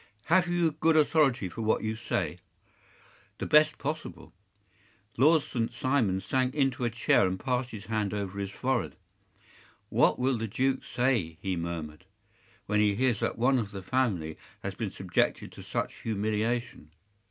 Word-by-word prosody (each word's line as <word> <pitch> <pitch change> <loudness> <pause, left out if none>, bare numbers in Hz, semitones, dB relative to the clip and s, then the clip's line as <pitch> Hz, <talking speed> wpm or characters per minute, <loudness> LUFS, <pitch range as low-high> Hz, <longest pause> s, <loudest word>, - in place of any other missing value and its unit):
Have 185 -1 +5
you 175 -2 +2
good 155 +1 +2
authority 145 - +3
for 115 - -7
what 110 0 +1
you 110 0 -1
say?” 115 - -2 1.0
“The - - -4
best 155 0 +5
possible.” 155 +3 -5 0.8
Lord 155 +4 +5
St. 115 -3 -2
Simon 115 -9 +1
sank 130 +7 0
into 135 -4 +1
a 120 - +2
chair 115 -4 +3
and 95 0 -3
passed 125 +2 -1
his 105 -4 -8
hand 110 -3 -1
over 100 -1 -4
his 100 -1 -3
forehead. 125 +4 -1 0.9
“What - - +3
will 130 -1 +1
the 115 - -2
duke 130 +5 0
say,” 115 -11 0
he 95 -1 -2
murmured, 85 -1 -5 0.6
“when 105 0 +1
he 105 -1 +3
hears 120 -2 +1
that - - -1
one 130 +3 +3
of 105 -4 -3
the 95 -2 -8
family 95 -10 -1 0.2
has - - -3
been - - -3
subjected - - -1
to - - -11
such - - -3
humiliation? 110 -3 -2
115 Hz, 160 wpm, -29 LUFS, 100-135 Hz, 1.0 s, Have